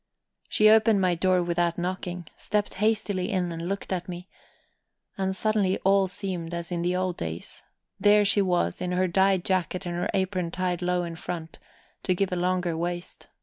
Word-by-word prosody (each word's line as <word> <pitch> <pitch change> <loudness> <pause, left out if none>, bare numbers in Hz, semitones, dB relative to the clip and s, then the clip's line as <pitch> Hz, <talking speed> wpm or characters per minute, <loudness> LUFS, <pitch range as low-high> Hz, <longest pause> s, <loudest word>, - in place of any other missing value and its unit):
She 215 - +4
opened 220 -1 +6
my 185 -2 +3
door 180 +1 +2
without 170 0 0
knocking, 180 0 -3
stepped 210 0 -1
hastily 210 -3 +1
in, 185 -4 0
and 165 +1 -4
looked 195 -1 -3
at 180 0 -4
me. 180 +1 -7 0.9
And 190 0 -1
suddenly 205 -2 +1
all 195 0 +4
seemed 180 -3 -4
as 170 +1 -5
in 170 -1 -1
the 175 +1 0
old 185 -1 -1
days. 80 +1 -5 0.4
There 210 0 +5
she 200 +1 +4
was 175 - 0
in 180 0 -1
her 185 +1 +2
dyed 190 0 +2
jacket 185 0 0
and 175 - -3
her 175 - -1
apron 185 -2 0
tied 180 0 -2
low 180 0 +1
in 170 -1 -6
front, 165 -1 -6 0.4
to 185 - +1
give 195 +1 0
a - - 0
longer 180 -1 0
waist. 175 +1 -4
180 Hz, 185 wpm, -26 LUFS, 175-195 Hz, 0.9 s, opened